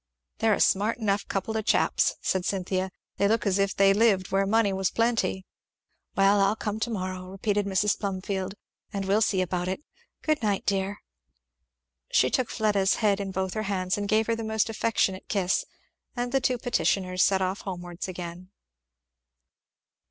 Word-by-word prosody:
"They're 220 -2 +3
a - - -6
smart 210 +4 +2
enough 205 -3 0
couple 200 +3 -2
of 220 - -1
chaps," - - +2
said 190 -1 0
Cynthia; 190 0 -1 0.3
"they 200 - +3
look 225 +1 +1
as 200 -1 +2
if 195 0 +1
they 195 0 +5
lived 200 -3 +2
where 195 0 +2
money 215 -1 +3
was 190 -1 0
plenty." 230 -5 0 0.7
"Well 200 +1 +4
I'll 195 +2 +3
come 215 -1 -3
to 230 - -1
morrow," 185 -3 -4
repeated 200 +1 -1
Mrs. 200 +1 +1
Plumfield, 195 -1 -3 0.4
"and 200 -2 -3
we'll 200 +3 +2
see 195 -3 +2
about 180 0 -2
it. 190 +10 -3 0.4
Good 310 -1 +1
night, 205 -3 0
dear!" 195 +1 -1 1.1
She 130 - +3
took 255 - +1
Fleda's 205 -3 +2
head 205 -3 +2
in 200 -1 -3
both 190 -1 -2
her 215 - -2
hands 185 -1 0
and 205 0 -3
gave 220 +1 +3
her 230 - 0
a 225 0 -3
most 220 0 0
affectionate 210 -4 0
kiss; 190 -3 +1 0.5
and 245 0 -2
the 270 0 +2
two 250 0 +1
petitioners 185 -5 0
set 190 0 +3
off 185 +2 -2
homewards 175 -2 -6
again. 180 0 -7
195 Hz, 175 wpm, -27 LUFS, 190-215 Hz, 1.1 s, they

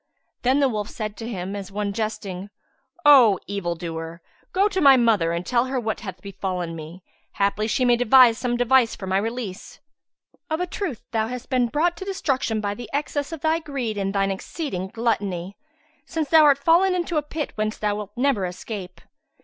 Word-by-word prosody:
Then 260 +3 +3
the 275 - +5
wolf 210 -4 -3
said 215 -2 -5
to 225 0 -6
him 190 -2 -4
as 200 -1 -7
one 200 0 -2
jesting, 205 -3 -4 0.6
"O 250 -9 +8
evil 195 -4 -3
doer, 165 0 -6 0.3
go 390 +2 +3
to 390 -3 -2
my 275 -3 +8
mother 215 -9 +3
and 170 +1 -3
tell 240 -1 +2
her 260 0 -2
what 220 -2 -2
hath 190 -4 -8
befallen 185 -3 -4
me; 165 +3 -9 0.3
haply 200 +2 0
she 255 +3 +1
may 240 -1 +4
devise 245 -1 +6
some 240 -1 -1
device 245 -1 +3
for 190 - -7
my 190 +1 +1
release." 225 -3 -5
Replied 290 - -53
the - - -40
fox, - - -60
"Of - - -6
a 360 - 0
truth 350 - -4
thou 220 -1 0
hast 250 +1 -7
been 250 -2 +3
brought 325 +8 +1
to 380 - -6
destruction 270 - -1
by 205 -1 -2
the 235 +1 -9
excess 285 +1 -2
of 325 -3 -6
thy 320 +1 +2
greed 270 -8 -4
and 195 -1 -1
thine 195 0 +1
exceeding 190 - -4
gluttony, 200 -4 -2 0.5
since 315 -3 -2
thou 320 -2 +7
art 285 -2 +6
fallen 345 +6 +3
into 345 -2 -1
a - - +3
pit 300 +1 -5
whence 215 0 -2
thou 210 -1 0
wilt 210 -1 -6
never 250 -8 +1
escape. 180 0 -7
225 Hz, 205 wpm, -23 LUFS, 195-275 Hz, 0.6 s, O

